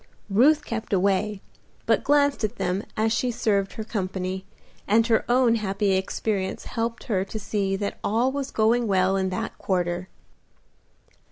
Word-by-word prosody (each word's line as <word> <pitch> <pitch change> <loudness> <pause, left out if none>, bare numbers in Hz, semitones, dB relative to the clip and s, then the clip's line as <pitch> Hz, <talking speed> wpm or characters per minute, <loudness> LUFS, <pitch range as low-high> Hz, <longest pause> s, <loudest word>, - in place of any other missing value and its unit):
Ruth 290 +9 +4
kept 225 -2 -4
away, 195 +1 +1 0.4
but - - +2
glanced 285 -3 +3
at 215 - -1
them 185 +3 -1
as 220 +1 +2
she 245 +2 0
served 210 -5 0
her 220 - -5
company, 190 -3 -3 0.4
and 225 +2 +4
her 230 -2 +2
own 245 -1 +4
happy 200 -1 0
experience 190 +1 -1
helped 230 0 -3
her 195 -6 0
to 210 - -6
see 200 -2 -1
that 200 +1 -4
all 235 +5 +2
was 275 0 -3
going 230 +2 +2
well 190 -1 +2
in 190 -1 0
that 185 - -4
quarter. 180 -1 -1
210 Hz, 155 wpm, -25 LUFS, 190-230 Hz, 0.4 s, Ruth